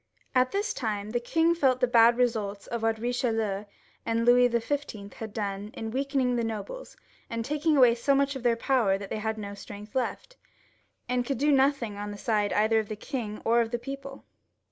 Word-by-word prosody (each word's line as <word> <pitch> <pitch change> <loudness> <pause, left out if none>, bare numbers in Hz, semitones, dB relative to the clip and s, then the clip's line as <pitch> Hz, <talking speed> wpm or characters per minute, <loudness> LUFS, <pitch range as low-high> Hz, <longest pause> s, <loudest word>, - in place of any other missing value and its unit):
At 255 0 +3
this 410 +1 -1
time 210 -3 -3
the 240 - 0
king 325 +7 +2
felt 265 -6 +2
the 250 - +4
bad 235 -1 +5
results 215 -5 0
of 235 -1 -4
what 225 0 +1
EicheHeu 225 -4 -1 0.4
and 230 0 0
Louis 245 0 +6
XIV. 235 -4 -3
had 220 -2 -7
done 200 -1 -4
in 225 0 -5
weakening 265 -1 0
the 235 - 0
nobles, 225 - -6 0.3
and 230 -1 -3
taking 300 +2 +1
away 250 -3 +7
so 275 +4 +1
much 280 0 +1
of 265 - -5
their 240 -1 +2
power 230 -5 +2
that 200 0 -9
they - - -2
had 220 +1 -2
no 200 -1 -6
strength 205 +1 -10
left, - - -3 0.7
and 250 0 0
could 275 +1 -2
do 295 +4 +2
nothing 270 -6 +2
on 205 0 -5
the 205 - -7
side 210 -1 0
either 220 +2 +3
of 215 - -4
the 215 - -3
king 220 -2 -5
or 235 +1 +4
of 230 - -1
the 240 - -1
people. 275 +2 -8
235 Hz, 205 wpm, -28 LUFS, 215-265 Hz, 0.7 s, away